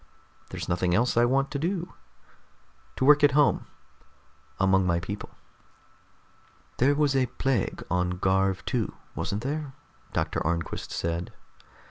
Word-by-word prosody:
There's - - -6
nothing 90 0 +1
else 120 +5 +2
I 120 +1 +5
want 135 +3 +1
to 140 - -2
do. 175 +2 -2 1.0
To 130 - 0
work 150 +1 +6
at 145 -2 +6
home, 145 0 +3 0.9
among 95 -1 +3
my 85 -1 +2
people." 100 +4 -6 1.5
"There 140 +3 +3
was 145 -2 +2
a 130 -1 +3
plague 130 -2 -1
on 90 0 0
Garv 95 +1 +1
II, - - 0 0.2
wasn't 105 +3 -3
there?" 145 0 -3 0.4
Doctor - - -1
Arnquist 85 +1 -2
said. 85 +1 -3
120 Hz, 130 wpm, -27 LUFS, 90-140 Hz, 1.5 s, work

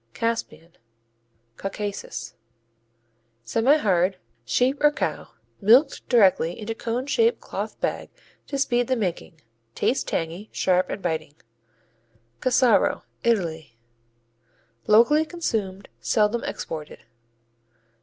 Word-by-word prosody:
Caspian 230 -7 -3 0.8
Caucasus 200 +1 -5 1.1
Semihard. 200 - +2 0.3
Sheep 250 - +1
or 295 - +8
cow, - - -3 0.3
milked 245 +8 +4
directly 190 -7 +3
into 220 +1 -4
cone 235 +3 -3
shaped 455 - +2
cloth - - -6
bag - - -2 0.4
to 280 - -3
speed 245 -3 +1
the 260 - +1
making. 175 -7 -4 0.3
Tastes 260 - +1
tangy, 170 +6 -4
sharp 185 0 +1
and 200 - -5
biting. 160 -4 -3 1.0
Cassaro 255 -1 +3 0.2
Italy 160 - -1 1.1
Locally 235 +9 +5
consumed, 220 - -3
seldom 215 +1 +1
exported. 155 -2 -6
215 Hz, 95 wpm, -24 LUFS, 180-250 Hz, 1.1 s, or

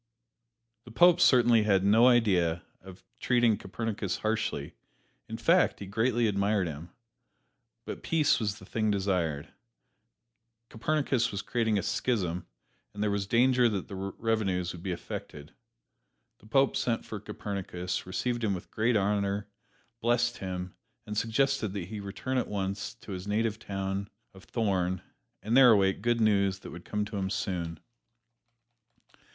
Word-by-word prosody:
The - - -11
Pope 175 +8 +5
certainly 120 -3 +6
had 100 -3 +2
no 110 +5 +6
idea 90 -9 +3 0.2
of 95 0 -13 0.2
treating 120 -3 +3
Copernicus 105 -1 -3
harshly; 110 0 -2 0.6
in - - -4
fact, - - +3
he 100 - -6
greatly 115 +4 +1
admired 100 -1 +1
him 80 +1 -6 1.0
but - - -6
peace 160 -3 +2
was 105 -3 -2
the 95 - -13
thing 110 +2 -1
desired. 90 -7 -1 1.2
Copernicus 130 0 0
was 100 0 -4
creating 110 -3 0
a 100 - -1
schism, 95 -5 -1 0.5
and 105 - -2
there 105 - +1
was 100 -1 -1
danger 125 +2 +4
that 100 -4 -4
the - - -7
revenues 95 -2 -1
would 90 - -9
be 95 - -3
affected. 75 -3 -7 0.9
The 110 - -18
Pope 135 +4 +3
sent 115 -2 -1
for 105 - -6
Copernicus, 95 -4 -5
received 120 +6 -2
him 100 -3 +1
with 90 - -9
great 110 +1 +2
honor, 100 0 0 0.5
blessed 120 +1 +1
him, 90 -1 -5 0.3
and 105 - -5
suggested 115 0 +1
that 100 -4 -4
he 110 - -5
return 105 +6 -3
at - - -2
once 100 -1 -3
to - - -10
his 95 +1 -6
native 110 +1 0
town 95 -1 -4 0.2
of 95 0 -15
Thorn 95 -5 -1 0.4
and 110 +3 0
there 130 -2 +8
await 95 -3 +3
good 120 0 +1
news 100 -3 +3
that - - -9
would 85 +1 -10
come 105 0 -2
to 105 0 -6
him 95 -1 -1
soon. 85 -5 -3
105 Hz, 150 wpm, -29 LUFS, 95-115 Hz, 1.2 s, there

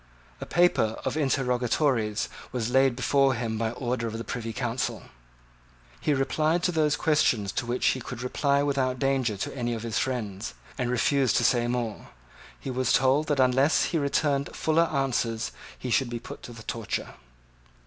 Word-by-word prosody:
A - - -7
paper 175 -11 +2
of - - -1
interrogatories 125 -5 +1 0.2
was 120 -1 -2
laid 130 -1 +4
before 135 +1 +3
him 115 -2 -3
by 115 -1 0
order 120 0 -2
of 110 0 -4
the 115 - -4
Privy 115 -2 -4
Council. 120 +1 -2 1.0
He 150 - +1
replied 155 +5 +1
to 180 - +2
those 155 -3 +2
questions 125 - +2
to 120 - -3
which 120 +1 -1
he 130 - -1
could 125 +1 -6
reply 140 +2 +1
without 135 -3 0
danger 130 -5 0
to 95 - -4
any 120 -2 -1
of 110 - -6
his 115 -3 -1
friends, 110 -5 -3 0.2
and 125 -2 -2
refused 130 +1 +2
to - - +2
say 120 -1 +3
more. 120 -3 -3 0.5
He 135 - -5
was 130 0 +1
told 135 +4 +3
that 145 -2 0
unless 130 +4 +4
he 165 - 0
returned 140 0 +1
fuller 160 +1 +2
answers 120 -5 -1 0.3
he 125 - -5
should 130 +1 +2
be 120 - -3
put 120 - -9
to - - -9
the 115 -1 -11
torture. 115 -1 -3
125 Hz, 175 wpm, -27 LUFS, 115-140 Hz, 1.0 s, laid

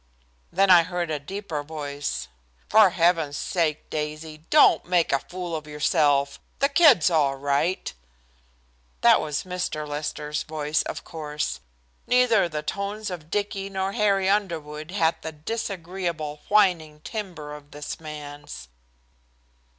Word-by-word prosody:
Then 195 +2 +4
I 175 -2 +9
heard 175 -1 -3
a 150 - -1
deeper 170 0 -5
voice. 145 -1 -4 0.4
"For 215 -3 +7
heaven's 165 -4 +2
sake, 160 -4 -1
Daisy, 155 +1 -4
don't 300 - +6
make 175 -2 +2
a 135 - +3
fool 175 +3 -6
of 155 -1 -6
yourself. 145 -2 +2 0.2
The 280 - +2
kid's 280 - +6
all 145 -4 +2
right." 145 +6 -1 1.1
That - - +6
was 150 -1 -2
Mr. 180 -4 -3
Lester's 150 0 -3
voice, 155 -1 -1
of - - -5
course. 150 -2 -4 0.5
Neither 240 -7 +4
the 150 -1 -4
tones 200 +4 -3
of 160 -3 -7
Dicky 200 0 -2
nor 190 0 -2
Harry 200 -3 +2
Underwood 160 -6 -1
had 165 -4 +1
the 160 - -5
disagreeable 170 -4 -4
whining 175 -8 +2
timbre 170 -8 -6
of 145 -1 -13
this 145 0 -7
man's. 145 - -9
160 Hz, 130 wpm, -25 LUFS, 150-190 Hz, 1.1 s, I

